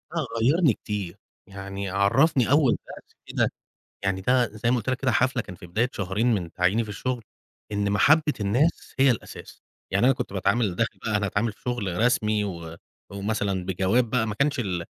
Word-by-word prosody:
آه، 160 -4 0 0.2
غيّرني 145 +3 +4
كتير. 100 -4 -5 0.3
يعني 100 0 -6
عرّفني 120 - +3
أول 145 -4 +5 0.2
دَرس - - -12
كده، - - 0 0.5
يعني 95 -1 0
ده 125 +4 +3
زي 110 +3 -2
ما - - +3
قُلت 120 - -3
لَك 130 - 0
كده، 130 -2 +2
حَفلة 130 +2 +2
كان 95 -4 -10
في 90 - -12
بداية 110 +9 0
شهرين 105 +5 0
من 90 -6 -2
تعييني 95 +6 +2
في 110 - -9
الشغل، 125 +3 -3 0.5
إن 100 -1 0
محبّة 150 +9 +4
الناس 120 +11 0
هي 135 0 +6
الأساس. 115 - -7 0.3
يعني 95 +5 +3
أنا 135 - +5
كنت 125 -6 -5
باتعامل، 100 0 +1
داخل 115 - -1
بقى 110 -2 +1
أنا 105 - -1
أتعامل 105 +3 0
في - - -29
شغل 105 -8 -2
رسمي، 110 -3 +2
و 85 -4 -6 0.4
ومثلا 100 -2 -2
بجواب 95 +6 +1
بقى، 115 -1 +1
ما 105 - -3
كانش 140 +3 +1
ال 90 -7 -2
105 Hz, 190 wpm, -25 LUFS, 95-125 Hz, 0.5 s, هي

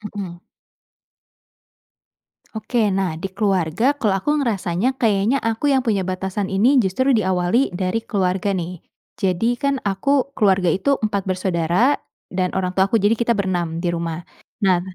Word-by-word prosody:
Mmm. 180 -4 -5 2.2
Oke, 220 +3 -3 0.2
nah 190 -3 0
di 195 - -2
keluarga 195 -2 0 0.2
kalau 210 -4 +2
aku - - -1
ngerasanya 220 -1 0
kayaknya 220 +3 +2
aku 225 +5 -1
yang 265 - +3
punya 215 -5 +1
batasan 190 +2 -2
ini 230 +9 +3
justru 260 +9 +1
diawali 190 +1 +1
dari 185 +4 -1
keluarga 190 0 0
nih. 175 -1 -4 0.4
Jadi 190 +3 +1
kan 280 0 +1
aku 265 +8 0
keluarga 190 -4 +3
itu 280 - +1
4 200 -2 0
bersaudara 185 - +1 0.3
dan 185 -1 0
orang 185 -1 0
tuaku 195 +3 +2
jadi 215 +3 +4
kita 235 0 +2
berenam 185 -4 -1 0.2
di - - 0
rumah. 170 0 -4 0.4
Nah 185 -2 +4
195 Hz, 140 wpm, -21 LUFS, 180-225 Hz, 2.2 s, jadi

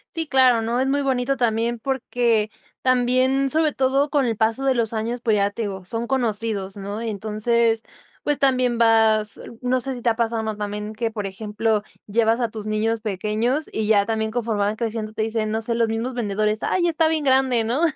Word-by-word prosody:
Sí, 325 -1 -2
claro, 255 -4 +4
¿no? 235 +2 -1
Es 265 - +1
muy 285 +1 +1
bonito 270 0 0
también, 235 0 0
porque 235 -4 0 0.3
también, 255 +2 +2
sobre 310 +1 +1
todo, 270 +2 +1
con 285 -3 +2
el 225 -2 -1
paso 225 +3 +1
de 270 -1 +2
los 230 -2 -1
años, 230 +2 -2
pues, 220 -4 +2
ya 200 0 +2
te 225 +3 -5
digo, 190 -3 -5
son 230 +4 -3
conocidos, 220 -6 -2
¿no? 200 +2 -5
Y 230 - -3
entonces, 220 +2 0 0.4
pues, 295 -1 0
también 255 -3 +2
vas 220 -2 +3 0.2
no 255 +1 +1
sé 265 +1 -4
si 240 - -9
te 240 - +3
ha 225 - +1
pasado 230 -1 -1
más 220 -1 -3
también 210 +1 -4
que, 225 +1 -2
por 215 -2 -5
ejemplo, 210 +2 -1 0.2
llevas 225 +3 +2
a 235 - 0
tus 215 -1 -7
niños 215 +1 0
pequeños 215 +7 -1
y 215 -1 -2
ya 205 -2 +4
también 220 0 -1
conforme 225 -2 -2
van 205 +1 +1
creciendo, 220 -1 -3
te 220 - -1
dicen, 220 -1 -1
no 220 +1 -2
sé, 235 +1 -1
los 230 -1 +2
mismos 225 +3 -2
vendedores, 215 -2 -1
"Ay, 345 -2 +1
está 325 -1 +2
bien 315 -2 0
grande", 260 -3 +3
¿no? 240 +7 -1
230 Hz, 210 wpm, -22 LUFS, 215-255 Hz, 0.4 s, claro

